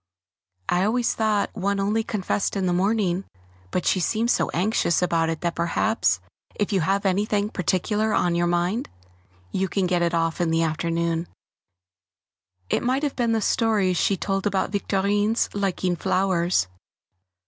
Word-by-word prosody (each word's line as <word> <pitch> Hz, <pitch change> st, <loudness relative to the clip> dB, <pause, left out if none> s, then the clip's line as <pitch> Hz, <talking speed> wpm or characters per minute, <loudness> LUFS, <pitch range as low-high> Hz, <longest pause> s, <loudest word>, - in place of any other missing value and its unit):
I 180 Hz, +1 st, +2 dB
always 230 Hz, +4 st, +1 dB
thought 215 Hz, -2 st, 0 dB
one 200 Hz, -1 st, -1 dB
only 210 Hz, +3 st, +1 dB
confessed 205 Hz, -2 st, -2 dB
in 195 Hz, -1 st, 0 dB
the 180 Hz, -, +1 dB
morning, 190 Hz, -1 st, +1 dB, 0.5 s
but 180 Hz, -, -2 dB
she 185 Hz, -, +2 dB
seemed 225 Hz, +6 st, +1 dB
so -, -, +1 dB
anxious 180 Hz, -1 st, +1 dB
about 165 Hz, -2 st, +1 dB
it 165 Hz, -1 st, -3 dB
that 170 Hz, -1 st, -1 dB
perhaps 170 Hz, +6 st, +1 dB, 0.4 s
if 205 Hz, 0 st, -1 dB
you 190 Hz, -, +2 dB
have 195 Hz, +5 st, 0 dB
anything 205 Hz, +2 st, +1 dB
particular 205 Hz, +4 st, 0 dB
on 175 Hz, -4 st, +2 dB
your 175 Hz, 0 st, +1 dB
mind 175 Hz, +7 st, 0 dB, 0.6 s
you 190 Hz, -, 0 dB
can 190 Hz, +1 st, 0 dB
get 180 Hz, -1 st, +1 dB
it 170 Hz, 0 st, +1 dB
off 165 Hz, +1 st, 0 dB
in 170 Hz, -, +1 dB
the 165 Hz, 0 st, +2 dB
afternoon; 165 Hz, +1 st, -1 dB, 1.4 s
it -, -, 0 dB
might 260 Hz, +4 st, 0 dB
have 290 Hz, -, -1 dB
been 235 Hz, -2 st, +1 dB
the 225 Hz, -, +1 dB
stories 210 Hz, -5 st, +2 dB
she 195 Hz, -, +2 dB
told 195 Hz, +2 st, -1 dB
about 195 Hz, -1 st, 0 dB
Victorine's 205 Hz, +2 st, 0 dB
liking 190 Hz, -3 st, -1 dB
flowers. 180 Hz, -, +1 dB
190 Hz, 160 wpm, -24 LUFS, 175-210 Hz, 1.4 s, I